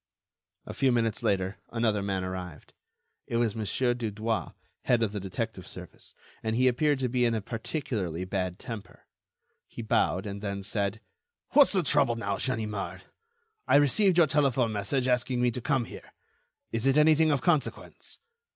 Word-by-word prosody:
A - - -7
few 135 -2 +2
minutes 115 -3 0
later, 95 +1 0
another 115 -3 0
man 95 -1 -2
arrived. 90 -4 -7 0.5
It 115 - -1
was 115 -3 +1
Mon. 110 -1 -3 0.3
Dudouis, 110 -1 -3 0.3
head 120 -2 +3
of 110 - 0
the 105 - -4
detective 95 0 -5
service, - - -10 0.3
and 110 0 -1
he 130 +2 +3
appeared 145 +4 +2
to 130 - +1
be 125 0 0
in 115 -1 +2
a - - 0
particularly 110 - -4
bad 90 -1 -2
temper. 115 -5 -9 0.6
He 115 - -8
bowed, 95 -4 +1
and 100 0 -5
then 100 -1 -4
said: 100 +1 -1 0.5
"What's 285 0 +6
the 185 -3 +2
trouble 140 -5 +3
now, 100 -3 -2
Ganimard? 110 -5 -3 0.6
I - - +4
received 170 +7 +4
your 170 - +7
telephone 135 -5 +2
message 110 +6 -1
asking 125 0 +1
me 125 0 +2
to 125 - -4
come 135 -2 +1
here. - - -12 0.6
Is 115 +3 0
it 135 +2 +4
anything 155 +1 +5
of 140 -3 +1
consequence?" 155 -5 -1
115 Hz, 165 wpm, -28 LUFS, 100-130 Hz, 0.6 s, your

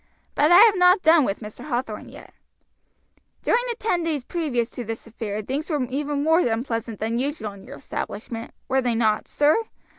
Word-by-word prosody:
But 300 +3 +3
I 350 - +9
have 440 -2 +7
not 360 +1 +5
done 320 -3 +6
with 195 0 -3
Mr. 210 -1 -9
Hathorn 240 -6 -4
yet. - - -13 1.1
"During 475 - +3
the 475 - -1
ten 425 -7 0
days 310 -5 -2
previous 255 -8 -2
to 245 - -6
this 225 0 -6
affair 215 -2 -5
things 280 - -3
wore 295 -5 0
even 285 +1 -1
more 320 +2 +4
unpleasant 230 - -2
than 225 +2 -1
usual 270 -5 -3
in 195 -1 -14
your - - -9
establishment, 225 +3 -6 0.2
were 265 0 +2
they 245 -2 0
not, 220 -2 +1
sir? 300 +10 +2
260 Hz, 185 wpm, -24 LUFS, 225-315 Hz, 1.1 s, I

